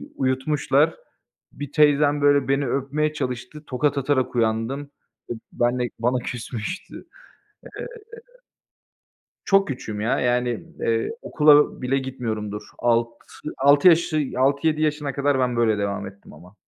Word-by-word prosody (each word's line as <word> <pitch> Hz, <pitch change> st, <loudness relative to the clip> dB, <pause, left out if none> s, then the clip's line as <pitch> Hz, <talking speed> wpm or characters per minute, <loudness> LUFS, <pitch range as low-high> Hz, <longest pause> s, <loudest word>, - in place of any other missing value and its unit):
uyutmuşlar. 135 Hz, +3 st, +1 dB, 0.6 s
Bir 145 Hz, -1 st, -8 dB
teyzem 145 Hz, -1 st, +3 dB
böyle 145 Hz, -1 st, +4 dB
beni 135 Hz, 0 st, +1 dB
öpmeye 140 Hz, +4 st, -1 dB
çalıştı, 130 Hz, +1 st, -5 dB
tokat 145 Hz, +3 st, 0 dB
atarak 135 Hz, -2 st, 0 dB
uyandım. 115 Hz, +4 st, 0 dB, 0.5 s
E, -, -, -1 dB, 0.2 s
ben 120 Hz, +1 st, 0 dB
de 120 Hz, -1 st, -1 dB
bana 125 Hz, +2 st, +1 dB
küsmüştü. 120 Hz, +6 st, -6 dB, 0.8 s
Eee -, -, -5 dB, 1.6 s
çok 195 Hz, 0 st, +3 dB
küçüğüm 110 Hz, -6 st, -5 dB
ya, 110 Hz, +3 st, 0 dB
yani, 125 Hz, -1 st, 0 dB
eee, 115 Hz, 0 st, 0 dB
okula 150 Hz, -2 st, +4 dB
bile 135 Hz, +2 st, +1 dB
gitmiyorumdur, 110 Hz, -6 st, -4 dB, 0.2 s
alt 115 Hz, -1 st, +2 dB, 0.5 s
altı 145 Hz, +6 st, +6 dB
yaşı 160 Hz, -3 st, +3 dB
6-7 140 Hz, +4 st, +2 dB
yaşına 150 Hz, -2 st, -1 dB
kadar 140 Hz, 0 st, +1 dB
ben 125 Hz, -2 st, 0 dB
böyle 110 Hz, -3 st, +2 dB
devam 100 Hz, 0 st, -2 dB
ettim 100 Hz, +1 st, -13 dB
ama. 90 Hz, +5 st, -16 dB
130 Hz, 125 wpm, -23 LUFS, 120-145 Hz, 1.6 s, altı